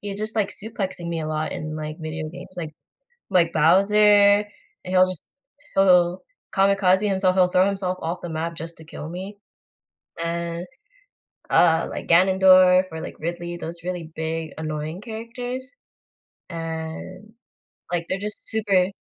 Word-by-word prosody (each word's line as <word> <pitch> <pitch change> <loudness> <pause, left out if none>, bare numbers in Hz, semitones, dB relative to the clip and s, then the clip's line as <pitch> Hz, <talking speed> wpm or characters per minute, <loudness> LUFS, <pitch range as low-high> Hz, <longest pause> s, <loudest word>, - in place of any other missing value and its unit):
he's 200 -1 -6
just, 215 +1 -2
like, 205 -2 +1
suplexing 195 -5 -4
me 165 -1 -2
a 155 - -3
lot 155 0 -2
in, 155 0 -5
like, 155 0 -5
video 155 0 -4
games, 180 +3 -10
like 160 -3 -4 0.6
like, 170 -3 +4
Bowser, 190 +6 +4 0.9
and 185 - -4
he'll 185 0 +6
just 185 -3 -4 0.5
he'll 180 -2 +4 0.3
kamikaze 195 0 +3
himself, 190 -2 +2
he'll 180 -1 +5
throw 185 +1 +3
himself 190 -2 -2
off 170 +3 -3
the 175 - -5
map 165 +1 -3
just 165 +1 -8
to 160 - -12
kill 155 -1 -8
me, 190 +4 -7 0.9
and, 170 +1 -3 0.8
uh, 165 -1 +4
like - - -6
Ganendorf 185 +1 +6
or, 160 - -6
like, - - -7
Ridley, 175 +1 -4
those 170 +1 -5
really 175 -3 -5
big 160 0 -3
annoying 155 +2 -4
characters, 245 +3 -6 0.8
and, 165 +5 -6 0.6
like, 170 -1 -1
they're 190 - -1
just 210 +1 -6
super 200 -5 +2
180 Hz, 150 wpm, -23 LUFS, 165-195 Hz, 0.9 s, he'll